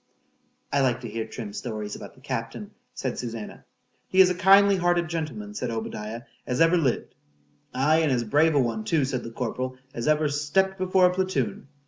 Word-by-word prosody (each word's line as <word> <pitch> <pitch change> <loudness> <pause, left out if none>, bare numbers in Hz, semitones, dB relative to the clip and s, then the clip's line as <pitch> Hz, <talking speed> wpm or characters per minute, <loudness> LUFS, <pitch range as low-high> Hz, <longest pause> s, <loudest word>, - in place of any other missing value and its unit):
I 140 - +3
like 125 -2 +1
to 120 - -6
hear 110 0 -4
Trim's 110 -3 -6
stories 110 -3 -5
about - - -10
the - - -20
captain, - - -5 0.2
said - - -3
Susannah.—He 115 - -6
is 185 -1 +8
a - - +1
kindly 195 +2 +6
hearted 175 -1 +1
gentleman, 145 -11 -4
said 115 +4 -3
Obadiah, 110 0 -5 0.2
as 125 - -1
ever 165 +2 +5
lived.—Aye, 125 - -1
and 160 -3 +2
as 120 -2 +1
brave 150 +7 +3
a - - +5
one 115 -4 0
too, 145 +5 +1
said 130 -1 -3
the - - -6
corporal, 130 +2 -4 0.2
as 120 - -4
ever 155 0 +3
stept 170 +7 0
before 185 0 +3
a 180 - +3
platoon. 145 - -2
135 Hz, 180 wpm, -26 LUFS, 115-170 Hz, 0.2 s, is